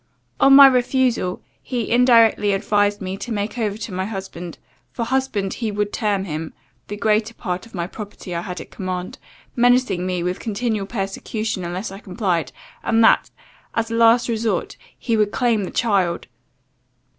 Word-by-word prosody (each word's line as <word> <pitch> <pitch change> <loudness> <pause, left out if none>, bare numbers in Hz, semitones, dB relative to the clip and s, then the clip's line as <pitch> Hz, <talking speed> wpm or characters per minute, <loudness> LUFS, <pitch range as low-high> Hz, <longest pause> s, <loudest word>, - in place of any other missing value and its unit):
On 275 0 +7
my 280 0 +11
refusal, 250 -6 +2 0.2
he 240 -4 -3
indirectly 230 -4 +5
advised 205 +1 +1
me 190 +1 -4
to 240 - -7
make 210 +2 -3
over 210 -2 -1
to 220 - -6
my 185 +1 -2
husband 190 -4 -7 0.3
for 230 - -3
husband 235 -6 -1
he 230 -3 -3
would 205 0 -2
term 205 -3 0
him 160 -3 -5 0.3
the 205 - -6
greater 215 +2 +1
part 180 0 -4
of - - -20
the 175 -3 -3
property 205 -2 -8
I 170 - -2
had 180 -1 -6
at - - -10
command, 185 -1 -5 0.4
menacing 245 -6 +3
me 180 -2 -1
with 180 +1 -2
continual 215 -2 -2
persecution 205 0 -3
unless 180 +4 -4
I 195 - -9
complied, 180 - -2 0.3
and 225 0 +2
that, - - +4 0.5
as 230 0 -1
a - - -1
last 230 +1 +5
resort, 225 -5 -1 0.2
he 230 -2 -1
would 210 -1 +2
claim 230 -5 +1
the - - -6
child. 195 -7 0
210 Hz, 170 wpm, -21 LUFS, 190-230 Hz, 0.5 s, my